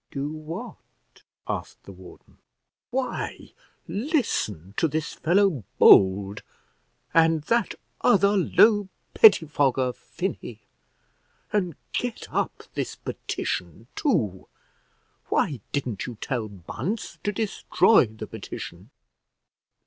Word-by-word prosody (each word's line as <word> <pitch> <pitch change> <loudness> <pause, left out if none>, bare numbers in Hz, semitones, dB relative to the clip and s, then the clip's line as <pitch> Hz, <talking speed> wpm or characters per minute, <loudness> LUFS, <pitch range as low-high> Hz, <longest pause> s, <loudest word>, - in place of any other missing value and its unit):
"Do 140 +1 -4
what?" 155 +1 -10 0.3
asked - - -5
the - - -11
warden. 95 -1 -15 0.5
"Why, 255 0 -4 0.4
listen 200 - -1
to 165 - +3
this 155 +1 -3
fellow 175 - +2
Bold, 100 +1 +6 0.7
and 165 -2 +4
that 230 +5 0 0.3
other 200 -3 +4
low 205 +1 +4 0.2
pettifogger, 145 - +4
Finney; - - -6 0.9
and 180 -7 0 0.2
get 245 -2 -4
up - - -2
this - - -3
petition 90 +5 -4
too. 105 - 0 0.8
Why 140 -5 +1
didn't 130 -8 -3
you 120 -3 -7
tell 120 -5 -2
Bunce 105 - -5
to 205 - 0
destroy 210 - +3
the 110 0 -8
petition?" - - -8
155 Hz, 95 wpm, -25 LUFS, -, 0.9 s, Bold